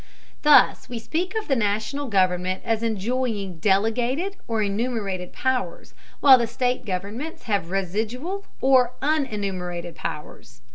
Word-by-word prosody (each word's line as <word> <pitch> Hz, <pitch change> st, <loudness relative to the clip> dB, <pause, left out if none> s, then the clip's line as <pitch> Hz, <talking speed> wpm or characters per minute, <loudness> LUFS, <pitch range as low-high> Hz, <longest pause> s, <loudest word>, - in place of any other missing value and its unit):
Thus 300 Hz, -1 st, +5 dB
we 245 Hz, -, -4 dB
speak 345 Hz, -, -3 dB
of 440 Hz, -1 st, -2 dB
the 270 Hz, -, +2 dB
National 220 Hz, +6 st, -1 dB
government 185 Hz, -3 st, +1 dB
as 225 Hz, -1 st, 0 dB
enjoying 220 Hz, -4 st, -2 dB
delegated 235 Hz, -, +1 dB
or 225 Hz, -2 st, 0 dB
enumerated 200 Hz, -3 st, -2 dB
powers, 255 Hz, -9 st, -2 dB, 0.3 s
while 265 Hz, -3 st, +8 dB
the 235 Hz, -, 0 dB
state 250 Hz, +2 st, -1 dB
governments 205 Hz, -, -4 dB
have 200 Hz, -7 st, -1 dB
residual 220 Hz, -, -2 dB, 0.2 s
or 255 Hz, -2 st, +4 dB
unenumerated 195 Hz, -, -2 dB
powers. -, -, -7 dB
225 Hz, 125 wpm, -24 LUFS, 195-260 Hz, 0.3 s, while